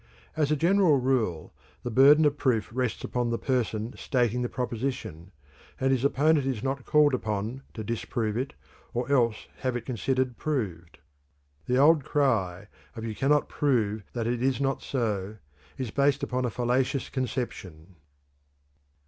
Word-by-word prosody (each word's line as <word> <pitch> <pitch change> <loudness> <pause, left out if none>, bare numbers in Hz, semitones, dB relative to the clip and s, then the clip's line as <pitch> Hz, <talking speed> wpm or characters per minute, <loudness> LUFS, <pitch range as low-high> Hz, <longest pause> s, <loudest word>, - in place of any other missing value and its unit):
As 150 -2 +1
a - - +4
general 170 0 +4
rule, 120 -11 -1 0.3
the 120 - -3
burden 145 +6 +7
of 145 -1 +3
proof 115 -8 0
rests 125 -2 -2
upon 125 -1 -1
the 115 - 0
person 120 -3 -1
stating 125 -2 0
the 120 - -1
proposition, 120 - -4 0.5
and 135 0 +2
his 130 -2 +1
opponent 145 0 +3
is 125 -5 -2
not 135 -1 -2
called 150 -2 +4
upon 110 +1 -2
to 110 - -5
disprove 110 -1 -2
it 130 +4 -3 0.4
or 125 +3 -2
else 115 -5 +2
have 130 -1 -1
it 120 - -4
considered 130 +1 -1
proved. 95 - -3 0.7
The 125 - +2
old 150 +2 +5
cry 105 -11 0 0.3
of 115 -1 -5
"You 110 - -3
cannot 140 +6 +2
prove 110 -7 0
that 115 -2 -2
it 120 +1 -1
is 130 0 +1
not 135 -1 0
so" 110 -5 -2 0.4
is 125 -5 -4
based 140 +2 +2
upon 125 0 -1
a - - 0
fallacious 125 +4 0
conception. 95 - -5
125 Hz, 155 wpm, -27 LUFS, 110-135 Hz, 0.7 s, burden